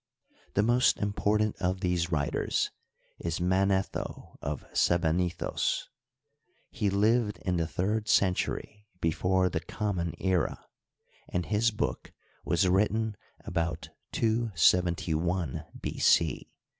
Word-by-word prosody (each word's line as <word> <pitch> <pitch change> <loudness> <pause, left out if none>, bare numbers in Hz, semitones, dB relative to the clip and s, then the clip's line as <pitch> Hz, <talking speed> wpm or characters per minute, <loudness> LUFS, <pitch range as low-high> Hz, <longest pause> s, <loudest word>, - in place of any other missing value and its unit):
The 100 - +4
most 120 +2 +4
important 105 +1 0
of 95 +1 -1
these 90 -2 0
writers 75 -3 0 0.5
is 85 0 -2
Manetho 95 +2 0
of 70 -1 -4
Sebennytkos, 85 +1 +1 0.8
He 105 - 0
lived 105 +2 +2
in 90 -2 +1
the 85 -1 0
third 105 +6 -1
century 105 +2 0
before 90 +3 +2
the 90 -2 -1
common 90 -3 -3
era, 95 -3 0 0.6
and 90 -1 -1
his 110 +2 +2
book 75 - -3 0.3
was 95 +2 +2
written 105 +3 +2 0.3
about 85 0 -2 0.2
271 90 - +1
B.C. 80 -2 +2
95 Hz, 100 wpm, -29 LUFS, 85-105 Hz, 0.8 s, The